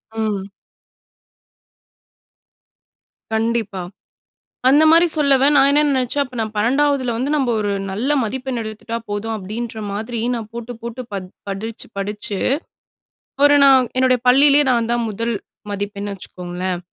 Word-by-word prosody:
ம். 210 Hz, -3 st, -2 dB, 2.9 s
கண்டிப்பா. 220 Hz, -4 st, -1 dB, 0.9 s
அந்த 290 Hz, +4 st, +6 dB
மாதிரி 335 Hz, +2 st, +6 dB
சொல்லவ 280 Hz, -2 st, +4 dB
நான் 275 Hz, 0 st, +6 dB
என்ன 290 Hz, -, +4 dB
நினைச்சேன், 260 Hz, +2 st, 0 dB
அப்போ 255 Hz, -2 st, -11 dB
நான் 220 Hz, -1 st, -3 dB
12வதில 260 Hz, +2 st, +1 dB
வந்து 260 Hz, +5 st, -1 dB
நம்ம 270 Hz, -4 st, +1 dB
ஒரு 205 Hz, -1 st, -1 dB, 0.2 s
நல்ல 225 Hz, +9 st, -2 dB
மதிப்பெண் 255 Hz, +2 st, -3 dB
எடுத்துட்டா 220 Hz, +1 st, -6 dB
போதும் 220 Hz, +2 st, -3 dB
அப்படின்ற 220 Hz, +3 st, -6 dB
மாதிரி, 225 Hz, +3 st, -4 dB
நான் 225 Hz, -2 st, -5 dB
போட்டு 235 Hz, +1 st, -6 dB
போட்டு 235 Hz, +1 st, -6 dB
ப -, -, -2 dB, 0.3 s
படிச்சு 220 Hz, +4 st, -5 dB
படிச்சு, 205 Hz, +1 st, -3 dB, 1.1 s
ஒரு 290 Hz, 0 st, +7 dB
நான் 265 Hz, -2 st, +6 dB
என்னுடைய 255 Hz, -1 st, +3 dB
பள்ளியிலேயே 280 Hz, +3 st, +6 dB
நான் 235 Hz, -2 st, +1 dB
தான் 240 Hz, 0 st, +1 dB
முதல் 230 Hz, +3 st, -2 dB, 0.4 s
மதிப்பெண் 205 Hz, 0 st, -4 dB
வச்சுக்கோங்களேன், 180 Hz, -1 st, -5 dB
230 Hz, 125 wpm, -20 LUFS, 210-260 Hz, 2.9 s, ஒரு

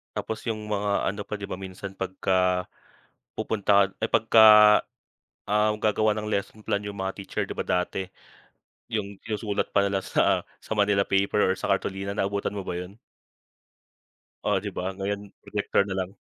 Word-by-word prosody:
Tapos 110 Hz, -, -3 dB
yung 110 Hz, -1 st, -3 dB
mga 100 Hz, -1 st, 0 dB
ano 105 Hz, -, -6 dB
pa 105 Hz, -, -3 dB
'di 100 Hz, -, -8 dB
ba 95 Hz, -, -5 dB
minsan 95 Hz, +1 st, -7 dB
pagka, 95 Hz, -1 st, 0 dB, 0.7 s
pupunta 100 Hz, -2 st, +2 dB
ka -, -, -26 dB
ay -, -, -1 dB
pagka, 110 Hz, 0 st, +5 dB, 1.0 s
ah, 105 Hz, +1 st, +2 dB
gagawa 110 Hz, 0 st, +1 dB
ng 105 Hz, 0 st, -3 dB
lesson 105 Hz, +2 st, -3 dB
plan 100 Hz, -2 st, 0 dB
yung 105 Hz, -1 st, -7 dB
mga 95 Hz, 0 st, -2 dB
teacher 95 Hz, -, -3 dB
'di -, -, -6 dB
ba -, -, -5 dB
dati, 90 Hz, +1 st, -1 dB, 0.8 s
yung 100 Hz, -3 st, -4 dB
yung 105 Hz, -2 st, -2 dB
sulat 105 Hz, -2 st, -1 dB
pa 100 Hz, -, +5 dB
nila 100 Hz, 0 st, +1 dB
sa -, -, +2 dB, 0.2 s
sa -, -, -7 dB
manila 100 Hz, -1 st, +3 dB
paper 100 Hz, +1 st, +1 dB
or 95 Hz, -, -1 dB
sa -, -, -3 dB
kartolina, 95 Hz, +1 st, -1 dB
naabutan 100 Hz, 0 st, -1 dB
mo 100 Hz, -, -4 dB
ba 90 Hz, -, -4 dB
yun? 90 Hz, +2 st, -7 dB, 1.5 s
Oo, -, -, +2 dB
'di -, -, -4 dB
ba -, -, -2 dB
ngayon 100 Hz, +1 st, -2 dB, 0.2 s
projector 100 Hz, -1 st, 0 dB
na 95 Hz, -, -3 dB
lang. 95 Hz, +2 st, -4 dB
100 Hz, 175 wpm, -26 LUFS, 95-105 Hz, 1.5 s, pagka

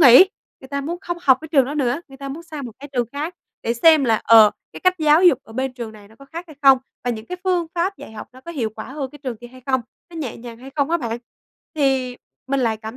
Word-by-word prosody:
nghỉ, 280 Hz, +6 st, +9 dB, 0.3 s
người 265 Hz, -, -12 dB
ta 280 Hz, 0 st, -2 dB
muốn 330 Hz, +5 st, -4 dB
không 345 Hz, -2 st, -4 dB
học 265 Hz, -6 st, +5 dB
cái 315 Hz, -, -9 dB
trường 285 Hz, -4 st, +4 dB
đó 280 Hz, +4 st, -4 dB
nữa. 275 Hz, 0 st, 0 dB
Người 270 Hz, -, -13 dB
ta 275 Hz, 0 st, -7 dB
muốn 295 Hz, +5 st, -6 dB
sang 310 Hz, -4 st, -7 dB
một 235 Hz, -, -9 dB
cái 285 Hz, -, -9 dB
trường 245 Hz, -3 st, 0 dB
khác 305 Hz, +5 st, -4 dB, 0.3 s
để 235 Hz, -, 0 dB
xem 310 Hz, +4 st, +6 dB
là, 225 Hz, -3 st, +3 dB
ờ, 220 Hz, -2 st, +8 dB, 0.2 s
cái -, -, -9 dB
cách 370 Hz, 0 st, +4 dB
giáo 310 Hz, +2 st, +5 dB
dục 345 Hz, -9 st, +7 dB
ở 225 Hz, -, -15 dB
bên 260 Hz, +2 st, -2 dB
trường 235 Hz, -3 st, -7 dB
này 205 Hz, -2 st, -15 dB
nó 220 Hz, -, -19 dB
có 275 Hz, -, -13 dB
khác 330 Hz, +5 st, -7 dB
hay 310 Hz, -4 st, -14 dB
không, 270 Hz, -1 st, +8 dB, 0.3 s
và 245 Hz, -, +1 dB
những 220 Hz, -1 st, -5 dB
cái 360 Hz, -, -5 dB
phương 360 Hz, -3 st, +1 dB
pháp 365 Hz, +3 st, 0 dB
dạy -, -, -11 dB
học 215 Hz, -, -8 dB
nó 255 Hz, -, -14 dB
có 340 Hz, -, -9 dB
hiệu 250 Hz, -10 st, -2 dB
quả -, -, -5 dB
hơn 275 Hz, -2 st, -4 dB
cái 295 Hz, -, -13 dB
trường 255 Hz, -5 st, -3 dB
kia 240 Hz, +3 st, -11 dB
hay 255 Hz, +1 st, -15 dB
không, 260 Hz, -1 st, +2 dB, 0.3 s
nó 335 Hz, -, -10 dB
nhẹ 285 Hz, -8 st, -4 dB
nhàng 230 Hz, -1 st, -10 dB
hay 260 Hz, +3 st, -11 dB
không 285 Hz, +1 st, +1 dB
á 340 Hz, -, +4 dB
bạn. 235 Hz, -6 st, -3 dB, 0.6 s
Thì 265 Hz, -4 st, +1 dB, 0.3 s
mình 275 Hz, 0 st, 0 dB
lại 225 Hz, -3 st, +1 dB
cảm 220 Hz, +2 st, -8 dB
270 Hz, 290 wpm, -21 LUFS, 240-310 Hz, 0.6 s, nghỉ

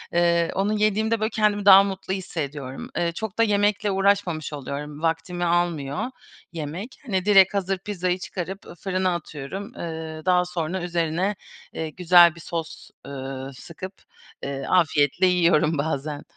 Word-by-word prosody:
ııı, 170 Hz, -1 st, +3 dB
onu 200 Hz, +2 st, +1 dB
yediğimde, 215 Hz, +1 st, +1 dB
böyle, 215 Hz, +1 st, 0 dB
kendimi 210 Hz, -2 st, +1 dB
daha 195 Hz, -1 st, +10 dB
mutlu 190 Hz, -1 st, -4 dB
hissediyorum. 145 Hz, -8 st, -5 dB
Iıı, 170 Hz, -1 st, +1 dB
çok 220 Hz, +3 st, -5 dB
da 230 Hz, -, +4 dB
yemekle 205 Hz, -1 st, +2 dB
uğraşmamış 195 Hz, -6 st, +1 dB
oluyorum, 145 Hz, +1 st, -6 dB
vaktimi 165 Hz, +2 st, -1 dB
almıyor 170 Hz, -4 st, 0 dB, 0.5 s
yemek. 165 Hz, -, -6 dB
Hani, 190 Hz, -6 st, -1 dB
direkt 195 Hz, -2 st, +6 dB
hazır 195 Hz, -1 st, 0 dB
pizzayı 185 Hz, -2 st, -2 dB
çıkarıp 185 Hz, -, -5 dB, 0.4 s
fırına 185 Hz, -1 st, 0 dB
atıyorum, 170 Hz, +5 st, -7 dB
ııı, 160 Hz, -1 st, -6 dB
daha 180 Hz, -1 st, +3 dB
sonra 180 Hz, 0 st, -3 dB
üzerine, 175 Hz, +3 st, -1 dB, 0.4 s
ııı, 160 Hz, -, -2 dB
güzel 175 Hz, 0 st, +6 dB
bir -, -, -12 dB
sos, 165 Hz, 0 st, -6 dB, 0.2 s
ııı, 135 Hz, 0 st, -6 dB
sıkıp, 175 Hz, +8 st, -9 dB, 0.5 s
ııı, 135 Hz, -1 st, -4 dB
afiyetle 155 Hz, -2 st, +3 dB
yiyorum 170 Hz, -3 st, +3 dB
bazen. 145 Hz, 0 st, -3 dB
175 Hz, 140 wpm, -24 LUFS, 155-195 Hz, 0.5 s, daha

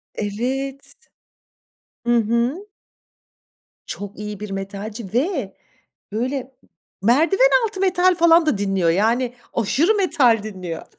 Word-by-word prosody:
Evet. 260 Hz, +6 st, -3 dB, 1.1 s
Hı 240 Hz, -, +3 dB
hı. 235 Hz, -, -1 dB, 1.2 s
Çok 205 Hz, 0 st, -7 dB
iyi 210 Hz, -1 st, -6 dB
bir 210 Hz, -1 st, -7 dB
metalci. 200 Hz, +2 st, -6 dB
Ve 265 Hz, -, -1 dB, 0.6 s
böyle 255 Hz, +4 st, -3 dB, 0.5 s
merdiven 325 Hz, -, +4 dB, 0.2 s
altı 420 Hz, -3 st, -5 dB
metal 370 Hz, -1 st, +3 dB
falan 335 Hz, -1 st, +5 dB
da 300 Hz, -, +1 dB
dinliyor, 195 Hz, -4 st, +1 dB
yani 235 Hz, +7 st, +1 dB, 0.2 s
aşırı 275 Hz, -, +2 dB
metal 265 Hz, -, +3 dB
dinliyor. 185 Hz, -6 st, -6 dB
240 Hz, 105 wpm, -21 LUFS, 205-320 Hz, 1.2 s, falan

